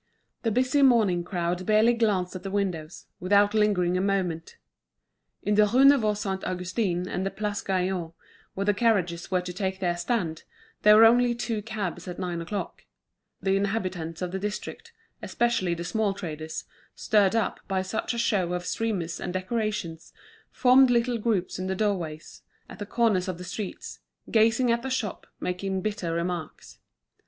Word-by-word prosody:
The 230 - 0
busy 255 +5 +2
morning 220 -10 +4
crowd 175 0 -2
barely 215 +2 +5
glanced 205 -6 0
at 185 - -5
the 195 - -5
windows, 180 -5 -3
without 200 +3 +3
lingering 195 -5 +2
a - - 0
moment. 185 -5 -2 0.9
In 210 - +1
the 210 0 +5
Rue 255 +6 +4
Neuve 225 -7 +5
Saint 195 -3 -3
Augustin 180 0 -1
and 180 - -5
in 185 - -3
the 195 - 0
Place 210 0 -3
Gaillon, 185 -3 -1 0.4
where 195 - -2
the 205 - +3
carriages 190 -7 +1
were 185 -1 +1
to 180 0 -6
take 190 +1 -3
their 175 -2 0
stand, 175 -3 -2 0.4
there 210 0 +7
were 225 +1 +8
only 240 +1 +4
two 225 -2 -2
cabs 195 -5 -5
at 180 - -6
nine 175 -2 -3
o'clock. 195 +4 -5 0.6
The 195 0 +2
inhabitants 185 -5 -2
of 180 - -3
the 190 - -3
district, 210 - -5 0.3
especially 235 -8 0
the 170 - -5
small 205 +2 0
traders, 160 -4 -6 0.3
stirred 205 -2 +2
up 225 -4 0
by 190 -1 0
such 220 +5 -3
a - - -4
show 195 -7 +1
of 180 0 -3
streamers 180 -8 -2
and 180 - -4
decorations, 185 -3 -3 0.4
formed 255 +1 +5
little 240 0 +1
groups 210 -6 -1
in 185 - -3
the 190 - -1
doorways, 180 -7 -3 0.3
at - - -12
the 205 - -5
corners 210 -6 +1
of 185 -2 -3
the 180 - -8
streets, 185 +2 -6 0.3
gazing 230 +2 +3
at 235 0 +1
the 265 - -4
shop, 240 -6 -3
making 190 +1 -2
bitter 205 -5 -2
remarks. 170 0 -4
195 Hz, 170 wpm, -26 LUFS, 180-220 Hz, 0.9 s, were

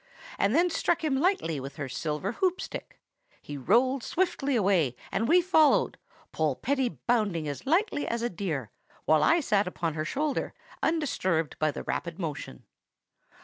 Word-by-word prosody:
—and - - +2
then 350 +2 +4
struck 340 0 0
him 300 -4 +1
lightly 280 - +1
with 135 +1 -7
her 140 - -4
silver 150 +7 -3
hoop 365 +9 0
stick; - - -7 0.4
he 145 - -8
rolled 255 - +2
swiftly 330 -4 0
away, 185 - +2 0.2
and 225 - 0
we 355 +5 +6
followed, 320 -4 +3 0.3
Polpetti 200 - 0
bounding 200 -10 +1
as 145 - -6
lightly 345 0 +1
as 235 0 -2
a 240 - +1
deer, 160 - -3 0.3
while 155 -1 +4
I 335 - +4
sat 205 -7 +1
upon 170 -3 -2
her 155 0 -2
shoulder, 290 - -2 0.3
undisturbed 190 - 0
by 155 - +2
the - - -5
rapid 170 0 -3
motion. 150 - -5
210 Hz, 155 wpm, -28 LUFS, -, 0.4 s, we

